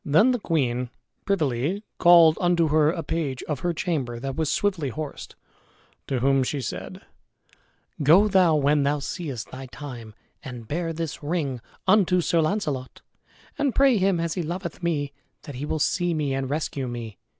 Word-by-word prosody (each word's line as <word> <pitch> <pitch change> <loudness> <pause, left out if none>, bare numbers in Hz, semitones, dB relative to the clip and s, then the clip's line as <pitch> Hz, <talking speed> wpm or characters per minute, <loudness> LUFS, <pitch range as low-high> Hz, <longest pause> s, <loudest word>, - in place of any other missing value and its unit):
Then 165 - +4
the 245 - 0
queen 125 - 0 0.4
privily 160 - 0 0.2
called 170 -2 +7
unto 175 -3 +3
her 155 0 +4
a 165 0 -2
page 145 -5 -3
of 150 -4 -3
her 175 +5 0
chamber 145 -9 -2
that 135 +1 -4
was 160 -1 0
swiftly 185 -9 0
horsed, 150 +3 -7 0.7
to 130 -3 -1
whom 135 +1 +3
she 140 +3 -1
said, 125 - -6 1.0
"Go 170 +9 +6
thou 185 -5 +4
when 145 0 +3
thou 140 +1 +1
seest 140 - -5
thy 130 +1 -8
time, 120 -5 -9 0.3
and 125 -5 -9
bear 165 +4 -2
this 165 0 -5
ring 145 -5 -2 0.2
unto 185 -2 +4
Sir 170 -1 +2
Launcelot, 155 -7 -2 0.6
and 280 -4 +1
pray 270 -4 +5
him 190 -2 +2
as 165 -1 -1
he 180 - -2
loveth 170 +1 -5
me, 145 -5 -1 0.3
that 150 -2 -8
he 135 +3 -5
will 160 - -1
see 175 +3 +1
me 145 -3 -1
and 135 -1 -2
rescue 140 -3 -2
me. 120 -3 -7
155 Hz, 170 wpm, -25 LUFS, 135-175 Hz, 1.0 s, called